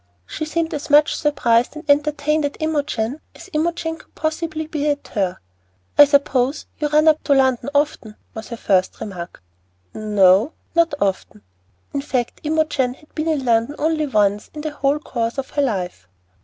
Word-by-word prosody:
She 310 - -5
seemed 325 +1 -2
as 300 +1 -5
much 295 +1 +5
surprised 245 -4 +1
and 305 0 -9
entertained 295 +1 +2
at 285 0 -2
Imogen 290 -4 -1
as 350 +3 -13
Imogen 325 +1 -1
could - - -21
possibly 315 0 -2
be 300 -1 -2
at 285 -1 -3
her. 190 -3 -1 0.6
"I 290 - +9
suppose 280 -1 +1
you 300 - +1
run 305 +1 +3
up 310 -1 +4
to 285 - +4
London 260 0 +2
often," 285 -7 0 0.2
was 220 - -7
her 235 - -6
first 185 -4 +1
remark. 180 - -7 0.5
"N 215 -1 -5
o, 195 - +5 0.2
not 335 -3 +2
often." 190 - -2 0.5
In 280 - -1
fact, 255 -4 -3
Imogen 300 -5 0
had 305 - -23
been 310 +1 -2
in 300 -5 0
London 230 +4 +2
only 310 -1 0
once 205 -4 +1
in 300 - -5
the 310 0 -3
whole 285 0 +1
course 235 -5 -3
of 270 -1 -4
her 290 - 0
life. 180 - -2
285 Hz, 175 wpm, -20 LUFS, 230-310 Hz, 0.6 s, I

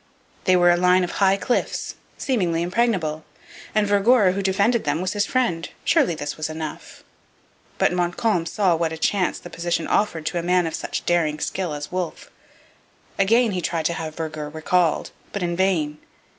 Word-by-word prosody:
They 185 - +5
were 175 -1 +5
a 175 - +3
line 180 +1 +4
of 175 - -2
high 195 -1 +3
cliffs, 245 +4 -1 0.2
seemingly 175 -10 0
impregnable, 175 -6 0 0.5
and 215 -1 +3
Vergor 205 0 +4
who 195 +2 -2
defended 200 +5 +2
them 150 +1 0
was 185 +1 -2
his 205 0 0
friend. 230 -11 0 0.2
Surely 170 - +3
this 145 -1 -5
was 155 0 -3
enough! 155 -1 -7 0.7
But - - +2
Montcalm 175 +1 0
saw 185 -1 +2
what 165 0 -1
a 160 - -5
chance 185 +2 +1
the 175 - -11
position 170 -1 -2
offered 170 -7 0
to 175 - -1
a - - -2
man 180 +1 +2
of 160 - -3
such - - -4
daring 165 -3 +1
skill 180 +2 -2
as 145 0 -7
Wolfe. 180 -2 -4 0.9
Again 225 +4 +4
he 185 -2 -2
tried 165 -2 -2
to 170 - +1
have 160 -1 -5
Vergor 155 -2 -5
recalled, 160 +2 0 0.2
but 200 - -3
in 175 0 -1
vain. 165 -5 0
175 Hz, 180 wpm, -23 LUFS, 160-195 Hz, 0.9 s, They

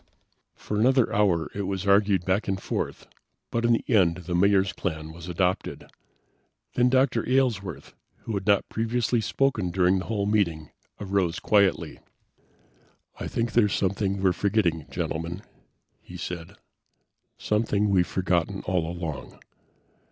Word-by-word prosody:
For 105 - -4
another 130 +1 +3
hour 95 -6 +2
it 100 -2 -3
was 95 0 -3
argued 100 -2 +3
back 95 +3 0
and 95 -1 -1
forth, - - -4 0.5
but 115 - -1
in 120 0 +4
the 115 - 0
end 90 -8 +3
the 90 - -3
Mayor's 95 +1 +3
plan 80 -4 -4
was 85 +1 -9
adopted. 90 +1 -2 0.8
Then 125 0 +3
Dr. 130 -3 +2
Aylesworth, 115 - 0 0.3
who 115 - -4
had 100 0 -3
not 100 -1 +3
previously 115 +1 0
spoken 115 -6 0
during 90 +1 +2
the - - -6
whole 105 -3 -1
meeting, 85 -8 0 0.3
arose 95 -4 0
quietly. 100 -2 +1 1.2
"I - - -4
think 115 0 -2
there's 105 -4 +3
something 100 0 -1
we're 95 -2 +4
forgetting, 90 -5 0
Gentlemen," 85 +4 -4 0.6
he - - -11
said. 90 +2 -6 0.8
"Something 105 -1 0
we've 90 -3 +3
forgotten 90 -3 -1
all 90 -3 0
along. 80 -6 -6
100 Hz, 135 wpm, -26 LUFS, 90-110 Hz, 1.2 s, in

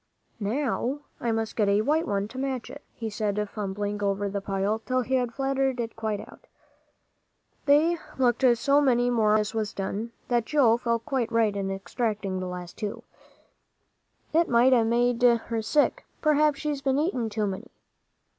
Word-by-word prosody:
"Now 255 +4 -1 0.2
I 235 - -1
must 225 0 -2
get 210 -3 +2
a 200 +1 +3
white 310 +8 +1
one 200 -1 -1
to 260 - -7
match 265 -3 -3
it," - - -11
he 225 - -4
said, 210 -1 -1
fumbling 205 0 -4
over 200 0 0
the 200 0 -3
pile 195 +2 -1
till 255 +3 -1
he 260 +2 -4
had 250 -2 +1
flattened 270 0 0
it 230 -1 -3
quite 220 -2 -2
out. - - -13 1.2
They 315 +4 +4 0.2
looked 250 -1 +2
so 280 +5 +3
many 245 -3 +3
more 220 -3 +3
when - - +5
this 215 +1 -1
was 215 -1 -2
done, 205 +4 -3 0.2
that 240 -2 +1
Joel 245 -6 +4
felt 235 -1 -1
quite 260 -6 -1
right 225 -3 +2
in 195 -1 -2
extracting 195 -1 -2
the 185 - -4
last 180 -1 -7
two. 210 -1 -4 1.3
"It 330 +1 +3
might 245 +2 +5
a' 235 -2 +5
made 240 +1 +1
her 235 -2 +3
sick. 290 +7 +1 0.2
P'r'aps 300 -1 +4
she's 295 -2 -3
been 270 -1 +1
eating 285 - 0
too 215 0 -1
many." 190 -2 -5
230 Hz, 175 wpm, -26 LUFS, 210-265 Hz, 1.3 s, when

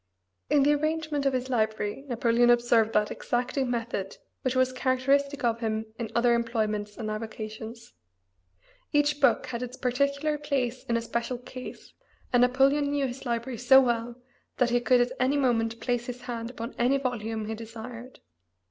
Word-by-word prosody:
In 285 -2 +4
the 295 +1 +5
arrangement 310 -1 0
of 270 - +1
his 255 0 -1
library 220 0 -1
Napoleon 240 -1 +3
observed 235 -2 +4
that 210 0 +2
exacting 250 +2 -1
method 230 -5 -3 0.2
which 255 0 -1
was 255 0 +2
characteristic 275 +2 +1
of 230 -1 +1
him 220 -1 -2
in 230 -2 -3
other 240 0 +4
employments 215 -3 -1
and 215 -2 -3
avocations. 220 +1 -7 1.0
Each 295 0 +2
book 275 - +4
had 235 -1 -5
its 250 0 -6
particular 280 +4 0
place 265 -4 -1
in 235 - +1
a - - -1
special 235 +2 -2
case, 255 +1 -10 0.4
and 245 - +5
Napoleon 270 +3 +3
knew 285 -1 0
his 255 +1 -6
library 235 0 -2
so 265 +2 +7
well 240 -2 0 0.4
that 245 -2 +2
he 245 - +3
could 245 0 +4
at 245 +1 +1
any 260 +3 +2
moment 230 -4 +1
place 245 -1 -1
his 250 0 -6
hand 230 -1 -5
upon 235 0 -6
any 250 +3 +3
volume 225 -4 -3
he 220 - -3
desired. 230 +3 -9
245 Hz, 165 wpm, -27 LUFS, 230-265 Hz, 1.0 s, so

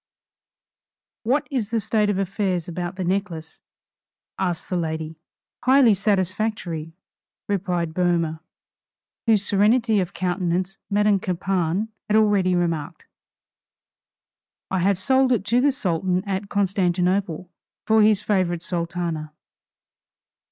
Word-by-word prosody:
"What 260 +6 0
is 240 -7 -1
the 230 0 0
state 215 0 +1
of 205 - 0
affairs 190 -3 -1
about 175 +1 -4
the 190 - -3
necklace," 175 -3 -3 0.8
asked 180 -3 -2
the 185 - -2
lady. 160 -1 -3 0.4
"Highly 260 -3 +6
satisfactory," 190 -4 -1 0.5
replied 180 -4 -1
Boehmer, 170 -2 0 0.9
whose 210 -3 +3
serenity 220 +2 +3
of 185 0 -2
countenance 180 +1 -1
Madame 205 -1 +3
Campan 185 +2 -1 0.2
had 210 - +2
already 200 -4 +3
remarked. 170 -2 -2 1.7
"I 190 - +1
have 195 +2 +2
sold 265 +6 +2
it 220 -5 +1
to 235 +4 +2
the 285 +2 +4
Sultan 185 - -1
at 195 0 -3
Constantinople, 185 -2 0 0.3
for 220 0 +4
his 210 -1 +4
favorite 180 -4 0
Sultana." 170 -3 -3
190 Hz, 110 wpm, -23 LUFS, 175-210 Hz, 1.7 s, Highly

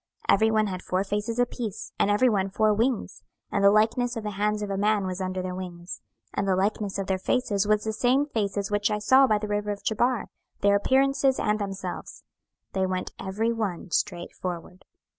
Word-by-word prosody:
26:010:021 - - +8
Every 220 0 +4
one 215 -1 +3
had 185 -3 -4
four 185 +1 -1
faces 210 +3 -2
apiece, 240 -4 -2
and - - +3
every 210 +5 +4
one 195 -4 +1
four 215 +2 +2
wings; 230 +2 -1 0.3
and 200 - 0
the 200 - +8
likeness 225 +4 +2
of 225 - -4
the 210 - -3
hands 210 +1 -1
of 200 - -4
a - - -1
man 205 0 +2
was 185 0 -4
under 185 0 -2
their 185 0 -3
wings. 180 -1 -7 0.3
26:010:022 - - -1
And 200 - 0
the 190 - +3
likeness 200 +1 -1
of 195 - -2
their 190 -1 -1
faces 205 -2 0
was 210 0 +2
the 220 - -2
same 255 +5 +2
faces 205 -6 -2
which 205 0 +1
I 210 - 0
saw 260 +6 +5
by 215 -3 +3
the 210 0 -4
river 210 0 -1
of 205 -1 -4
Chebar, 240 +2 0 0.3
their 200 0 +4
appearances 270 +4 +3
and 210 0 +1
themselves: 195 -2 -5 0.5
they 190 -1 +1
went 185 0 -3
every 220 +5 -1
one 195 -6 -3
straight 175 -1 -1
forward. 180 0 -6
205 Hz, 215 wpm, -26 LUFS, 190-220 Hz, 0.5 s, 26:010:021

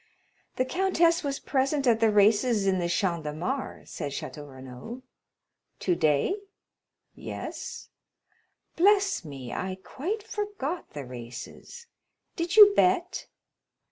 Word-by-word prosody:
"The 255 - +1
countess 340 +2 +2
was 280 -1 -1
present 275 +1 0
at 230 -3 +4
the 225 -1 +4
races 210 +1 +4
in 190 -1 +2
the 170 -1 -1
Champ 170 -2 0
de 150 - -3
Mars," 250 - -4
said 140 - -4
Château 145 +1 -6
Renaud. 130 - -9 0.7
"Today?" 170 - +1 0.8
"Yes." - - -7 0.9
"Bless 390 - +3
me, 135 -6 -8
I 185 0 -3
quite 385 - -4
forgot 410 -7 -4
the 145 -2 -6
races. 125 - -9 0.5
Did 340 +1 -2
you 410 -1 +10
bet?" 365 -1 +2
245 Hz, 115 wpm, -27 LUFS, -, 0.9 s, you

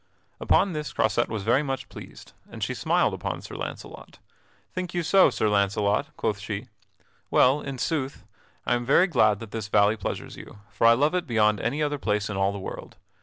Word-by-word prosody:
Upon 195 -3 +2
this 150 -1 -5
Croisette 110 +2 +1
was 110 -3 -4
very 120 +6 +3
much 135 -2 -4
pleased, - - -12 0.2
and - - -7
she - - -1
smiled - - +1
upon - - -4
Sir - - -10
Launcelot. - - -8 0.6
"Think 180 -1 -5
you 175 - 0
so, 190 +3 +5
Sir 110 - -1
Launcelot?" 100 0 +1
quoth 100 -2 -1
she. 110 +3 -6 0.6
"Well, 135 +4 +4
in 135 -1 -6
sooth, 140 -1 -3 0.4
I - - +1
am 120 0 0
very 140 +8 +4
glad 110 - +3
that 115 -3 -9
this 110 -2 -4
valley 105 +1 +3
pleasures 100 - -5
you; - - -12
for 115 - +2
I 115 - +8
love 145 +7 +2
it 180 -2 -1
beyond 105 -3 +2
any 140 +7 -1
other 145 -1 -1
place 105 -3 -1
in - - -4
all 95 0 +1
the 100 - -6
world. 95 - -8
115 Hz, 200 wpm, -25 LUFS, 105-145 Hz, 0.6 s, I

